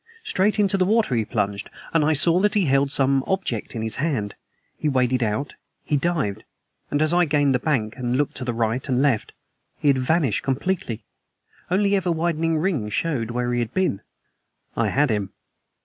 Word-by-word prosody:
Straight 205 Hz, +3 st, +1 dB
into 195 Hz, -2 st, +2 dB
the 185 Hz, -, +3 dB
water 215 Hz, -, +2 dB
he 115 Hz, -3 st, +1 dB
plunged; 100 Hz, 0 st, -2 dB, 0.2 s
and 165 Hz, -2 st, +3 dB
I 155 Hz, +1 st, +3 dB
saw 165 Hz, +4 st, +3 dB
that 210 Hz, +2 st, +1 dB
he 200 Hz, -4 st, +3 dB
held 140 Hz, 0 st, +2 dB
some 135 Hz, -1 st, +2 dB
object 185 Hz, -, -2 dB
in 110 Hz, -, -3 dB
his 110 Hz, -1 st, -2 dB
hand. 130 Hz, -10 st, -1 dB, 0.4 s
He 150 Hz, -, -1 dB
waded 130 Hz, -2 st, +1 dB
out; 115 Hz, +5 st, -1 dB, 0.3 s
he 150 Hz, -, 0 dB
dived; 140 Hz, -, -1 dB, 0.5 s
and 145 Hz, +1 st, +1 dB
as 155 Hz, +2 st, +2 dB
I 175 Hz, 0 st, +4 dB
gained 145 Hz, -2 st, +2 dB
the 125 Hz, -, +2 dB
bank 120 Hz, -6 st, -1 dB
and 125 Hz, -1 st, -1 dB
looked 145 Hz, 0 st, -1 dB
to 130 Hz, -, -4 dB
right 115 Hz, +3 st, -1 dB
and 125 Hz, -1 st, +2 dB
left 130 Hz, -6 st, +1 dB, 0.5 s
he 145 Hz, -, +1 dB
had 135 Hz, -2 st, +3 dB
vanished 135 Hz, -, +1 dB
completely. 135 Hz, -, -2 dB, 0.6 s
Only 200 Hz, +2 st, +2 dB
ever 185 Hz, -3 st, 0 dB
widening 165 Hz, -1 st, 0 dB
rings 155 Hz, -, -1 dB
showed 135 Hz, -9 st, -1 dB
where 120 Hz, +1 st, -1 dB
he 120 Hz, -, +1 dB
had 120 Hz, -2 st, -3 dB
been. 185 Hz, -, 0 dB, 0.7 s
I -, -, +1 dB
had 145 Hz, -2 st, +2 dB
him. 100 Hz, -3 st, -2 dB
140 Hz, 190 wpm, -23 LUFS, 120-170 Hz, 0.7 s, I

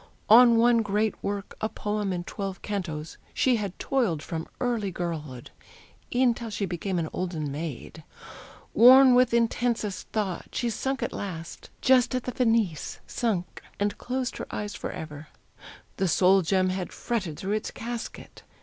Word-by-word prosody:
On 235 Hz, +1 st, +8 dB
one 235 Hz, 0 st, +5 dB
great 210 Hz, 0 st, 0 dB
work, 200 Hz, 0 st, -4 dB
A 215 Hz, -, 0 dB
poem 210 Hz, -2 st, -2 dB
in 175 Hz, -1 st, -2 dB
twelve 195 Hz, 0 st, -6 dB
cantos, 165 Hz, -7 st, -4 dB, 0.2 s
she 255 Hz, -3 st, +3 dB
had 200 Hz, -4 st, -4 dB
toiled 215 Hz, -, 0 dB
From 160 Hz, -2 st, -5 dB
early 235 Hz, -5 st, 0 dB
girlhood, 160 Hz, -8 st, -5 dB, 0.6 s
e'en 245 Hz, -1 st, +3 dB
till 230 Hz, -1 st, -7 dB
she 205 Hz, -1 st, -2 dB
became 185 Hz, +1 st, -3 dB
An 165 Hz, -2 st, -1 dB
olden 165 Hz, -5 st, -3 dB
maid. 155 Hz, +1 st, -6 dB, 0.7 s
Worn 255 Hz, +2 st, +8 dB
with 250 Hz, 0 st, +5 dB
intensest 235 Hz, -3 st, 0 dB
thought, 200 Hz, -5 st, -3 dB
She 240 Hz, -1 st, 0 dB
sunk 265 Hz, +3 st, -2 dB
at -, -, -3 dB
last, 170 Hz, -4 st, -7 dB
just 255 Hz, -1 st, +4 dB
at 255 Hz, -, -1 dB
the 250 Hz, -, -3 dB
"finis" 225 Hz, -, 0 dB
sunk! 205 Hz, -7 st, -2 dB, 0.2 s
And 205 Hz, 0 st, 0 dB
closed 255 Hz, 0 st, -3 dB
her -, -, -6 dB
eyes 210 Hz, 0 st, -4 dB
forever! 150 Hz, -1 st, -7 dB, 0.7 s
The 190 Hz, -, +1 dB
soul 190 Hz, +2 st, +4 dB
gem 185 Hz, +2 st, +2 dB
Had 185 Hz, -1 st, -3 dB
fretted 195 Hz, -11 st, -3 dB
through 195 Hz, +2 st, -2 dB
its 215 Hz, -, -5 dB
casket! 235 Hz, 0 st, -7 dB
205 Hz, 155 wpm, -27 LUFS, 175-235 Hz, 0.7 s, On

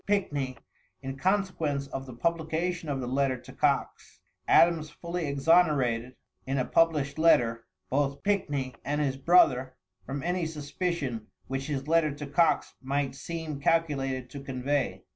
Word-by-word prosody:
Pickney 145 Hz, -, 0 dB, 0.5 s
in 135 Hz, 0 st, -4 dB
consequence 165 Hz, -4 st, 0 dB
of 135 Hz, -1 st, -6 dB
the 130 Hz, -, -8 dB
publication 165 Hz, +4 st, -1 dB
of 140 Hz, -2 st, -1 dB
the 125 Hz, -, -4 dB
letter 135 Hz, 0 st, +1 dB
to -, -, -13 dB
Coxe, -, -, -1 dB, 0.3 s
Adams 165 Hz, -2 st, +4 dB
fully 170 Hz, +1 st, -4 dB
exonerated, 140 Hz, -5 st, +2 dB, 0.3 s
in 135 Hz, +1 st, 0 dB
a 130 Hz, -, +1 dB
published 155 Hz, -3 st, +2 dB
letter, 115 Hz, -8 st, +3 dB, 0.2 s
both 140 Hz, +1 st, 0 dB
Pickney 145 Hz, -10 st, 0 dB
and 145 Hz, +1 st, -1 dB
his 140 Hz, -3 st, 0 dB
brother 135 Hz, -4 st, +4 dB, 0.3 s
from 135 Hz, +7 st, -5 dB
any 175 Hz, -1 st, 0 dB
suspicion 150 Hz, -6 st, -3 dB, 0.2 s
which 135 Hz, 0 st, -4 dB
his 140 Hz, -2 st, -3 dB
letter 160 Hz, -1 st, +3 dB
to 145 Hz, +1 st, -6 dB
Coxe 160 Hz, +4 st, +2 dB
might 140 Hz, +1 st, -1 dB
seem 160 Hz, 0 st, -5 dB
calculated 135 Hz, -5 st, 0 dB
to 140 Hz, -, -7 dB
convey. 135 Hz, +1 st, -2 dB
145 Hz, 145 wpm, -28 LUFS, 135-165 Hz, 0.5 s, Adams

